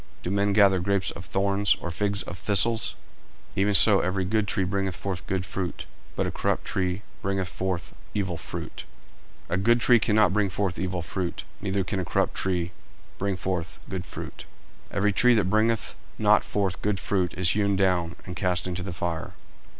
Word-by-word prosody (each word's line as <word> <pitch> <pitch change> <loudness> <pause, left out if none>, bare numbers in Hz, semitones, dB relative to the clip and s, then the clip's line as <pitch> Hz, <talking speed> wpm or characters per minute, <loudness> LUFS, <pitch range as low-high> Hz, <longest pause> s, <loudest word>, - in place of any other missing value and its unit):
Do 90 - -2
men 100 +1 +2
gather 100 -2 +5
grapes 100 +1 +1
of 85 - -9
thorns, 100 +1 +2
or 90 - -4
figs 100 +2 0
of 85 - -7
thistles? 110 +5 +2 0.6
40:007:017 - - +1
Even 105 +1 +3
so 100 -1 +8
every 95 +1 0
good 105 +2 +1
tree 95 - 0
bringeth 95 -1 -1
forth 90 -3 -4
good 95 -1 -1
fruit; 90 -1 -4 0.3
but - - 0
a - - -2
corrupt - - -1
tree 95 +1 -1 0.2
bringeth 95 -1 -1
forth 95 -2 -3 0.2
evil 95 -4 -1
fruit. - - -6 0.6
40:007:018 - - -3
A - - +2
good 120 +4 +4
tree 120 +1 +6
cannot 105 -4 +3
bring 105 -1 +2
forth 95 -1 -2
evil 90 -2 -2
fruit, 90 +1 -3 0.2
neither 95 0 0
can 95 +2 -2
a 90 - -2
corrupt - - 0
tree 90 -2 -1 0.5
bring 100 -1 -1
forth 90 -2 -3
good 95 -1 -4
fruit. - - -7 0.4
40:007:019 - - -7
Every 105 +1 +3
tree 125 +4 +5
that 100 -5 +2
bringeth 110 0 +2 0.2
not - - +4
forth 95 -3 -1
good 105 -1 0
fruit 95 -3 0
is 90 -1 +2
hewn 100 -1 +2
down, 90 -3 +1
and 90 - -6
cast 90 -2 0
into 90 0 -3
the 90 -1 -5
fire. 85 -1 -4
95 Hz, 190 wpm, -26 LUFS, 90-100 Hz, 0.6 s, so